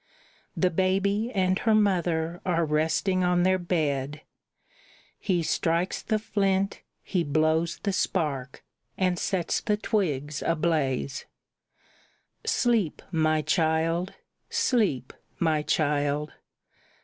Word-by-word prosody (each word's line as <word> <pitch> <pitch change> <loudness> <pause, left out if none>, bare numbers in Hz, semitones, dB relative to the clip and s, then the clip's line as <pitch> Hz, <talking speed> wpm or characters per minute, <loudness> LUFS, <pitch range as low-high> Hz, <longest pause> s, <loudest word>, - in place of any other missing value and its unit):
The 185 -1 +2
baby 195 +5 +1
and 190 -3 +1
her 220 -2 +3
mother 175 -5 +1
are 170 -2 +1
resting 160 +5 +1
on 180 0 +2
their 185 0 +3
bed; 150 -5 -1 1.0
He 180 -4 0
strikes 165 +3 0
the 220 - 0
flint, 195 -2 0 0.2
he 180 -3 0
blows 155 +3 +1
the 200 - 0
spark, 135 -7 -2 0.3
and 185 -2 +1
sets 180 -3 -1
the 210 -2 0
twigs 150 -9 -1
ablaze. 155 -5 0 1.2
"Sleep, 230 - +1
my 155 -2 +2
child; 165 +2 +1 0.4
sleep, 230 - +1 0.2
my 160 -3 +1
child! 150 -1 0
170 Hz, 100 wpm, -27 LUFS, 155-190 Hz, 1.2 s, her